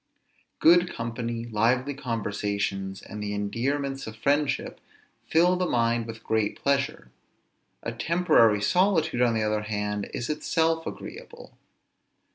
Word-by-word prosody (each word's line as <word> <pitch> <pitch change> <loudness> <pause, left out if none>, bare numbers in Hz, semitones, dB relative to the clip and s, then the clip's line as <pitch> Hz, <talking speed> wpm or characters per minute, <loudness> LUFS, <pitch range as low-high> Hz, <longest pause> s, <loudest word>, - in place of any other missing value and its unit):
Good 175 +2 +5
company, 115 0 -4
lively 120 +5 +1
conversations, 100 -6 -3
and 105 +1 -8
the 105 0 -3
endearments 135 +7 -2
of 110 - -7
friendship, 140 +3 0 0.5
fill 175 +3 +4
the 180 0 0
mind 115 -2 +1
with 115 0 -8
great 110 -2 0
pleasure; 140 - -1 0.7
a 115 - -3
temporary 115 - +3
solitude, 160 - +2
on 120 -2 +3
the 110 - +1
other 105 0 0
hand, 105 -1 -3
is 120 - -4
itself 160 +2 0
agreeable. 485 0 -9
115 Hz, 120 wpm, -26 LUFS, 105-145 Hz, 0.7 s, Good